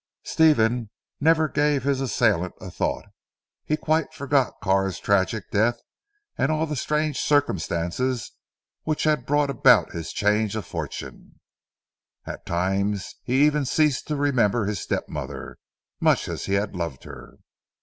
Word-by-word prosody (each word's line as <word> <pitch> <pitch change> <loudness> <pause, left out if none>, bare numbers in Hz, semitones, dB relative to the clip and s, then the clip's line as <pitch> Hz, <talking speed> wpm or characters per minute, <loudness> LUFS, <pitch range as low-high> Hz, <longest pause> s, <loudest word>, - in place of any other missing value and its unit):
Stephen 120 -8 +3 0.3
never 160 +1 +4
gave 145 -1 +1
his 135 -1 0
assailant 105 -8 +1
a - - -8
thought. - - -2 0.6
He 155 - 0
quite 160 0 0
forgot 140 -1 +1
Carr's 95 -1 +1
tragic 100 +1 0
death, 115 +3 +2 0.6
and 135 - +2
all 155 +1 +1
the 150 -1 -4
strange 150 +2 -1
circumstances 120 - 0 0.5
which 155 -1 -2
had 150 -5 +1
brought 145 0 +2
about 125 -3 +5
his 85 -1 -5
change 105 0 +1
of 110 -5 -4
fortune. - - -7 0.9
At - - -8
times 95 +3 -1
he 130 +4 +4
even 150 -1 +2
ceased 145 0 +1
to 150 - -1
remember 120 -6 +2
his 105 -2 -2
step - - -2
mother, - - -7 0.4
much - - +2
as - - -4
he 100 - -2
had 100 0 0
loved 85 -7 -4
her. - - -11
125 Hz, 140 wpm, -24 LUFS, 100-145 Hz, 0.9 s, about